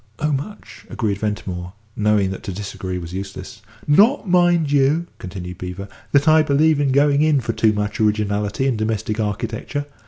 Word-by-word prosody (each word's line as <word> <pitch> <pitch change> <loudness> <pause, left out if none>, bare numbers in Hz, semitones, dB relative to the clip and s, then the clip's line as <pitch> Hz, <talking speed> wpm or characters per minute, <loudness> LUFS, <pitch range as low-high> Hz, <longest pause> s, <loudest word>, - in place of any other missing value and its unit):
"Oh, 150 0 -1
much," 170 +10 -6
agreed 100 -3 -2
Ventimore, 95 -4 -4 0.2
knowing 105 -2 +2
that 95 - -6
to 100 - -3
disagree 95 -1 -5
was 85 -1 -7
useless. 100 +3 -7 0.2
"Not, 210 - +4
mind 175 -4 +3
you," 145 +4 +3
continued 90 -1 -7
Beevor, 90 +2 -6 0.2
"that 140 +1 +3
I 155 0 +6
believe 155 +1 +3
in 140 -2 +1
going 140 +1 +3
in 155 -2 +3
for 115 -2 -3
too 110 -1 +3
much 105 0 -3
originality 105 +2 0
in 130 -4 +1
domestic 110 0 -2
architecture. 110 +7 -3
110 Hz, 165 wpm, -20 LUFS, 100-145 Hz, 0.2 s, I